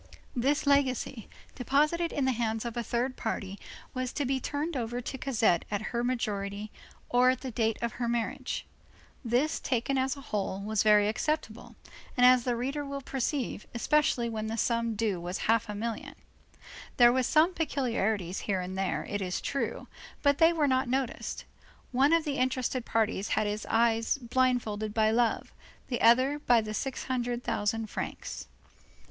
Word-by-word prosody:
This 275 Hz, +5 st, +1 dB
legacy, 270 Hz, -5 st, +1 dB, 0.2 s
deposited 305 Hz, +7 st, +1 dB
in 280 Hz, -, 0 dB
the 260 Hz, -, +3 dB
hands 225 Hz, -1 st, -1 dB
of 235 Hz, 0 st, -4 dB
a 240 Hz, -, -1 dB
third 245 Hz, +3 st, -1 dB
party, 195 Hz, 0 st, -4 dB, 0.3 s
was 255 Hz, -1 st, -2 dB
to 290 Hz, -, -1 dB
be 265 Hz, +1 st, 0 dB
turned 295 Hz, +5 st, -3 dB
over 240 Hz, -1 st, -2 dB
to 250 Hz, +2 st, -5 dB
Cosette 225 Hz, -10 st, +2 dB
at 205 Hz, 0 st, -1 dB
her 235 Hz, 0 st, 0 dB
majority, 210 Hz, -4 st, -2 dB, 0.4 s
or 250 Hz, +1 st, +4 dB
at 255 Hz, -1 st, 0 dB
the 260 Hz, -1 st, -5 dB
date 225 Hz, -1 st, 0 dB
of 235 Hz, -, 0 dB
her 240 Hz, +1 st, -3 dB
marriage. 235 Hz, -1 st, -2 dB, 0.6 s
This, 250 Hz, +6 st, +1 dB
taken 265 Hz, +1 st, 0 dB
as 265 Hz, +2 st, 0 dB
a -, -, -9 dB
whole, 200 Hz, -5 st, -2 dB
was 210 Hz, +1 st, 0 dB
very 210 Hz, -1 st, +5 dB
acceptable, 235 Hz, 0 st, -2 dB, 0.4 s
as 250 Hz, 0 st, +6 dB
the 245 Hz, -2 st, +1 dB
reader 270 Hz, +5 st, -2 dB
will 280 Hz, 0 st, -5 dB
perceive, 265 Hz, -3 st, -2 dB
especially 255 Hz, -1 st, +2 dB
when 220 Hz, -1 st, -3 dB
the 225 Hz, +1 st, -3 dB
sum 230 Hz, 0 st, 0 dB
due 205 Hz, -5 st, -1 dB
was 180 Hz, +2 st, -3 dB
half 225 Hz, 0 st, +2 dB
a 210 Hz, -, -3 dB
million. 225 Hz, +1 st, -4 dB, 0.8 s
There 240 Hz, -1 st, +7 dB
were 260 Hz, -, +2 dB
some 315 Hz, +8 st, +3 dB
peculiarities 225 Hz, -, -1 dB
here 195 Hz, -3 st, -1 dB
and 180 Hz, +1 st, -5 dB
there, 190 Hz, 0 st, -1 dB
it 205 Hz, 0 st, -3 dB
is 180 Hz, -1 st, -2 dB
true, 275 Hz, -, -3 dB, 0.4 s
but 285 Hz, 0 st, +3 dB
they 325 Hz, 0 st, +7 dB
were 320 Hz, -3 st, +1 dB
not 260 Hz, -1 st, +1 dB
noticed; 260 Hz, -1 st, -2 dB, 0.5 s
one 265 Hz, +4 st, +4 dB
of 330 Hz, -1 st, +4 dB
the 290 Hz, -3 st, -2 dB
interested 255 Hz, -1 st, 0 dB
parties 220 Hz, -3 st, 0 dB
had 215 Hz, -, +2 dB
his 210 Hz, 0 st, -3 dB
eyes 230 Hz, +2 st, +2 dB
blindfolded 235 Hz, -4 st, 0 dB
by 220 Hz, -1 st, +3 dB
love, 230 Hz, 0 st, +1 dB, 0.4 s
the 245 Hz, -, -2 dB
others 260 Hz, +6 st, +4 dB
by 240 Hz, -1 st, +6 dB
the 215 Hz, -1 st, -4 dB
six 265 Hz, +4 st, -3 dB
hundred 245 Hz, -1 st, -2 dB
thousand 220 Hz, +2 st, -1 dB
francs. -, -, -5 dB
240 Hz, 170 wpm, -29 LUFS, 220-265 Hz, 0.8 s, There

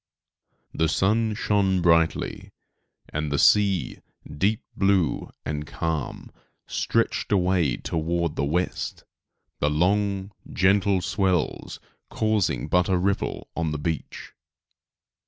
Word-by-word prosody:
The 80 Hz, 0 st, +1 dB
sun 110 Hz, +5 st, +1 dB
shone 100 Hz, -3 st, +1 dB
brightly, 85 Hz, -1 st, +1 dB, 0.6 s
and 75 Hz, -1 st, -3 dB
the 70 Hz, -, +1 dB
sea, 100 Hz, -1 st, +3 dB, 0.4 s
deep 105 Hz, +7 st, +1 dB
blue 95 Hz, -5 st, +1 dB, 0.2 s
and 75 Hz, 0 st, -3 dB
calm, 80 Hz, -4 st, -4 dB, 0.3 s
stretched -, -, -1 dB
away 90 Hz, -9 st, +2 dB
toward 85 Hz, 0 st, -2 dB
the -, -, -1 dB
west, 85 Hz, +6 st, -2 dB, 0.6 s
the 75 Hz, -, +2 dB
long, 100 Hz, +5 st, +1 dB, 0.2 s
gentle 100 Hz, 0 st, +3 dB
swells 95 Hz, -5 st, -1 dB, 0.3 s
causing 110 Hz, -3 st, 0 dB
but 90 Hz, +1 st, +2 dB
a 95 Hz, -, +3 dB
ripple 100 Hz, +2 st, -1 dB
on 80 Hz, -2 st, -1 dB
the -, -, -2 dB
beach. 80 Hz, +1 st, -5 dB
90 Hz, 105 wpm, -25 LUFS, 80-100 Hz, 0.6 s, sea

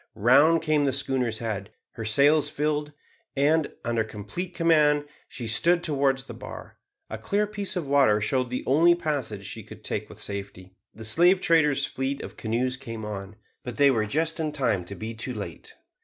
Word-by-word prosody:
Round 145 Hz, +9 st, +5 dB
came 155 Hz, -2 st, +2 dB
the 135 Hz, -, +1 dB
schooner's 130 Hz, -4 st, 0 dB
head. 105 Hz, -3 st, -4 dB, 0.2 s
Her 115 Hz, -3 st, -7 dB
sails 140 Hz, +7 st, +4 dB
filled, 150 Hz, 0 st, -1 dB, 0.5 s
and, 150 Hz, +2 st, +2 dB
under 115 Hz, -1 st, +1 dB
complete 110 Hz, -, -7 dB
command, 150 Hz, -3 st, +3 dB, 0.2 s
she 120 Hz, -, -7 dB
stood 170 Hz, +11 st, +2 dB
towards 135 Hz, -3 st, +1 dB
the -, -, -9 dB
bar. -, -, -10 dB, 0.3 s
A 110 Hz, -, -5 dB
clear 205 Hz, -, 0 dB
piece 205 Hz, -2 st, -3 dB
of 175 Hz, -4 st, -2 dB
water 135 Hz, -7 st, +4 dB
showed 125 Hz, +4 st, 0 dB
the 125 Hz, -, -3 dB
only 165 Hz, +6 st, +5 dB
passage 145 Hz, -, -3 dB
she -, -, -6 dB
could -, -, -13 dB
take -, -, -3 dB
with -, -, -12 dB
safety. 100 Hz, -2 st, -6 dB, 0.2 s
The 110 Hz, +2 st, -9 dB
slave 175 Hz, -, +4 dB
trader's 160 Hz, -5 st, +3 dB
fleet 135 Hz, +1 st, -3 dB
of -, -, -9 dB
canoes 125 Hz, +3 st, -1 dB
came 115 Hz, -5 st, -7 dB
on, 100 Hz, -1 st, -6 dB, 0.3 s
but 125 Hz, -2 st, -6 dB
they 140 Hz, -1 st, +5 dB
were 110 Hz, -4 st, 0 dB
just 160 Hz, +8 st, -1 dB
in 155 Hz, -1 st, -1 dB
time 115 Hz, -11 st, 0 dB
to 100 Hz, -, -7 dB
be 110 Hz, +2 st, -6 dB
too 115 Hz, +2 st, -5 dB
late. 95 Hz, -7 st, -8 dB
135 Hz, 185 wpm, -26 LUFS, 110-155 Hz, 0.5 s, Round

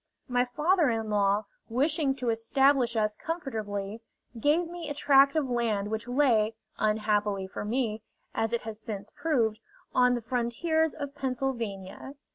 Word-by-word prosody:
My 245 Hz, -1 st, +2 dB
father 305 Hz, +5 st, +2 dB
in 225 Hz, -2 st, -2 dB
law, 205 Hz, 0 st, +2 dB, 0.2 s
wishing 280 Hz, +3 st, +1 dB
to 250 Hz, -3 st, -2 dB
establish 245 Hz, +2 st, +2 dB
us 215 Hz, -1 st, +1 dB
comfortably, 220 Hz, -, -4 dB, 0.4 s
gave 310 Hz, +7 st, +2 dB
me 340 Hz, -2 st, -6 dB
a 290 Hz, -, -3 dB
tract 280 Hz, 0 st, +5 dB
of 305 Hz, -4 st, +1 dB
land 220 Hz, -4 st, 0 dB
which 220 Hz, +1 st, -3 dB
lay, 240 Hz, -5 st, +3 dB, 0.2 s
unhappily 210 Hz, -2 st, +1 dB
for 190 Hz, -, -6 dB
me, 220 Hz, -1 st, -1 dB, 0.3 s
as 225 Hz, 0 st, 0 dB
it 235 Hz, -, -1 dB
has 220 Hz, -1 st, -6 dB
since 205 Hz, -2 st, -6 dB
proved, 235 Hz, -9 st, 0 dB, 0.3 s
on 250 Hz, 0 st, +4 dB
the 240 Hz, -, -3 dB
frontiers 270 Hz, +7 st, 0 dB
of 285 Hz, -2 st, -5 dB
Pennsylvania. 250 Hz, -5 st, -4 dB
240 Hz, 145 wpm, -28 LUFS, 215-280 Hz, 0.4 s, tract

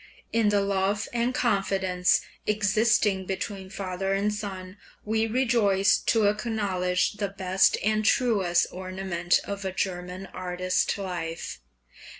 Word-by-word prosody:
In 225 Hz, -2 st, +3 dB
the 205 Hz, -1 st, +2 dB
love 200 Hz, +1 st, 0 dB
and 240 Hz, +1 st, +1 dB
confidence 190 Hz, -6 st, +1 dB, 0.3 s
existing 210 Hz, -2 st, +2 dB
between 190 Hz, 0 st, -4 dB
father 195 Hz, 0 st, -2 dB
and 205 Hz, +2 st, 0 dB
son 195 Hz, -2 st, -6 dB, 0.3 s
we 220 Hz, +1 st, +1 dB
rejoice 225 Hz, -5 st, +3 dB
to 225 Hz, -2 st, +2 dB
acknowledge 205 Hz, -4 st, 0 dB
the 200 Hz, -2 st, -2 dB
best 190 Hz, -1 st, +2 dB
and 215 Hz, +1 st, +1 dB
truest 205 Hz, -7 st, +2 dB
ornament 185 Hz, -1 st, -1 dB
of 200 Hz, 0 st, -5 dB
a 190 Hz, -, -2 dB
German 180 Hz, 0 st, -4 dB
artist 185 Hz, +1 st, -1 dB
life. 170 Hz, -, -5 dB
195 Hz, 120 wpm, -26 LUFS, 185-210 Hz, 0.3 s, In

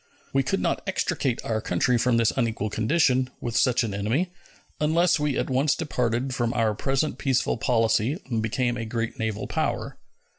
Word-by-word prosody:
We 135 Hz, -, +4 dB
could 135 Hz, +9 st, -1 dB
not -, -, 0 dB
extricate 135 Hz, -9 st, -1 dB
our 110 Hz, -1 st, -1 dB
country 110 Hz, +6 st, +1 dB
from 120 Hz, 0 st, +2 dB
this 115 Hz, -2 st, +3 dB
unequal 110 Hz, -4 st, -1 dB
condition, 130 Hz, +2 st, +2 dB
with 120 Hz, -1 st, -4 dB
such 125 Hz, -1 st, +3 dB
an 110 Hz, -3 st, -3 dB
enemy, 115 Hz, -, 0 dB, 0.5 s
unless 160 Hz, +3 st, +3 dB
we 150 Hz, -2 st, 0 dB
at -, -, 0 dB
once 140 Hz, +2 st, +2 dB
departed 125 Hz, -3 st, -1 dB
from 120 Hz, -1 st, -1 dB
our 110 Hz, -2 st, +2 dB
present 135 Hz, +7 st, -1 dB
peaceful 130 Hz, -3 st, +1 dB
policy 115 Hz, -, +1 dB
and 115 Hz, -4 st, -1 dB
became 120 Hz, +2 st, 0 dB
a 115 Hz, -, -3 dB
great 115 Hz, +2 st, -3 dB
naval 110 Hz, -1 st, -2 dB
power. -, -, -2 dB
125 Hz, 175 wpm, -25 LUFS, 115-135 Hz, 0.5 s, We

